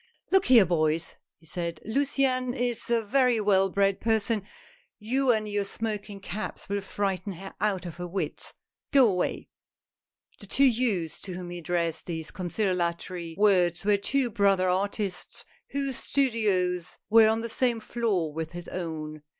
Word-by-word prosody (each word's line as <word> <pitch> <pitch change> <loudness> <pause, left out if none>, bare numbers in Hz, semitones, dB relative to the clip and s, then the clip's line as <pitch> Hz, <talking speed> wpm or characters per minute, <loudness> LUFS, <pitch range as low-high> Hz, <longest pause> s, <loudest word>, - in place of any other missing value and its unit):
" - - -37
Look 385 0 +4
here, 235 -6 +7
boys," 160 -1 0 0.2
he 165 - -23
said, 170 0 -3
" - - -23
Luciane 255 +1 +1
is 240 -2 -1
a 235 -1 +2
very 250 +1 +3
well 195 -2 +3
bred 195 0 +1
person; 220 -1 +1 0.6
you 255 +5 0
and 215 -2 0
your 205 -1 0
smoking 210 -1 -4
caps 200 +2 -5
will 200 0 -1
frighten 195 0 -2
her 190 +3 -9
out 200 -3 0
of 170 -2 -7
her 175 0 -5
wits! 190 +2 -3 0.4
Go 270 -3 +6
away! 180 -4 -1 0.5
" - - -39
The - - -10
two 275 - +4
youths 220 - +1
to 190 - -6
whom 180 -1 -6
he 175 - -5
addressed 170 -1 -2
these 160 -2 -4
concili 185 +1 -1
atory 170 -1 -3
words 185 -4 +3
were 205 0 +5
two 245 +5 +1
brother 195 -2 +3
artists, 195 +1 -2 0.2
whose 275 -2 -2
studios 195 -9 0
were 225 0 +8
on 220 +1 +1
the 230 - -3
same 235 0 +1
floor 210 -9 -1
with 160 +1 -4
his 175 0 -7
own. 155 -4 -5
200 Hz, 165 wpm, -27 LUFS, 175-225 Hz, 0.6 s, were